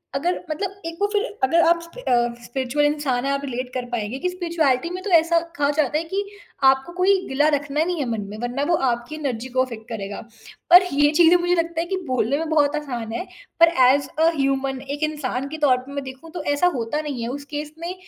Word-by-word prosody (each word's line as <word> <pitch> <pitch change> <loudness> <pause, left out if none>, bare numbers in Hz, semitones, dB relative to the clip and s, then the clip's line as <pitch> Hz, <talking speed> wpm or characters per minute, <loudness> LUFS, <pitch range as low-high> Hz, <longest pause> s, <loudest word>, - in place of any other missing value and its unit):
अगर 345 +6 0
मतलब 390 +5 -4
एक 330 0 -5
वो 410 - +3
फिर 415 0 +2 0.2
अगर 330 +6 +4
आप 340 0 +4
स्पि 335 +9 -11
अ, 240 - +1
स्पिरिचुअल 265 +4 -1
इंसान 290 -4 0
हैं, 275 - +1
आप 275 0 -1
रिलेट 255 -1 -4
कर 255 -1 -3
पाएँगे 235 +2 -3
कि 360 - -1
स्पिरिचुअलिटी 335 -5 0
में 365 +1 -5
तो 415 - -3
ऐसा 335 +1 +3 0.2
कहा 285 0 +2
जाता 295 -1 +1
है, 320 - -1
कि 390 +5 -3 0.4
आपको 265 +5 +3
कोई 380 +1 +4
गिला 290 +3 +2
रखना 290 +2 -1
नहीं 350 0 -2
है 285 - 0
मन 225 -2 -2
में 210 - -7
वरना 245 +3 -2
वो 340 - +4
आपकी 240 +5 -3
एनर्जी 260 -6 -3
को 255 - +4
एफ़ेक्ट 230 -3 -8
करेगा। 200 -3 -5 0.5
पर 355 +2 +9
ये 290 +1 +3
चीज़ें 340 0 +7
मुझे 350 0 +1
लगता 335 -1 -1
है - - -2
कि 385 - -1
बोलने 255 +1 +1
में 320 0 -3
बहुत 300 -2 +3
आसान 245 -7 -4
है, 295 +11 -3 0.3
पर 335 - +8 0.2
ऐज़ 275 +1 +3
अ 325 +1 +5
ह्यूमन 270 -1 0 0.2
एक 295 - -5
इंसान 275 -4 -2
के 315 - -6
तौर 255 -3 +4
पर 255 +2 -10
मैं 280 0 -3
देखूँ 265 +5 -10
तो 355 - -6
ऐसा 285 +5 +3
होता 245 +5 -2
नहीं 285 -5 -5
है, - - -2
उस 280 +2 -6
केस 295 +1 -6
में 340 +2 -4
290 Hz, 235 wpm, -22 LUFS, 255-335 Hz, 0.5 s, पर